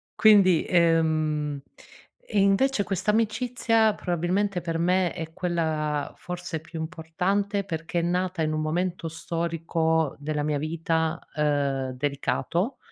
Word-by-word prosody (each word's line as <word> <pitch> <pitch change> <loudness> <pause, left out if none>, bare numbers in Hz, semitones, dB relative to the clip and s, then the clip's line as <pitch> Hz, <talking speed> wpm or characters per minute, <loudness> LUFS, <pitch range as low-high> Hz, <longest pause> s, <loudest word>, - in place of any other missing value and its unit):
Quindi, 195 -6 +6
ehm 155 -4 +2 0.7
invece 205 +4 +3
questa 200 +2 0
amicizia 225 0 +2
probabilmente 180 +2 -1
per 165 -1 -2
me 180 +1 +2
è 160 -2 -6
quella 160 -4 -1
forse 180 -2 -5
più 160 +1 -8
importante 185 +5 -1
perché 165 -1 -3
è - - +1
nata 180 +1 -1
in 155 -1 0
un 155 - -1
momento 170 +2 -1
storico 165 -1 -1
della 150 0 -2
mia 150 0 0
vita, 160 +1 -1 0.2
uhm, 140 -3 0
delicato. 145 - -1
165 Hz, 115 wpm, -26 LUFS, 155-185 Hz, 0.7 s, Quindi